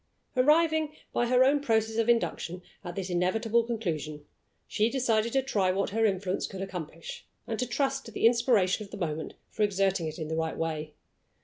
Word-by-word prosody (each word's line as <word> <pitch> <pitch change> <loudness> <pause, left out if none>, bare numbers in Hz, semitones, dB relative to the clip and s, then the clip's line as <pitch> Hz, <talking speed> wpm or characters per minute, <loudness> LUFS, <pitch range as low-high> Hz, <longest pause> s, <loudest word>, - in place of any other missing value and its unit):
Arriving, 310 +3 +3 0.2
by 240 - +1
her 250 +1 +5
own 280 +2 +4
process 225 -4 +1
of 230 0 +2
induction, 185 -6 0 0.2
at 175 0 -6
this 190 -1 -4
inevitable 220 +6 +2
conclusion, 160 -10 -3 0.4
she 215 +2 +1
decided 235 -3 +1
to 270 +1 +2
try 205 -8 +1
what 195 +1 0
her 225 +1 +3
influence 190 -1 -1
could 195 -1 -6
accomplish, 165 -4 -7 0.2
and 225 - -3
to 250 - 0
trust 270 +2 -1
to 225 - -9
the 225 - 0
inspiration 230 -5 +3
of 200 - -12
the - - -8
moment 160 -4 -3 0.2
for - - -5
exerting 195 -4 +2
it 155 - -6
in 160 -3 -4
the 160 - -2
right 160 0 -2
way. 155 -2 -3
210 Hz, 190 wpm, -29 LUFS, 180-235 Hz, 0.4 s, her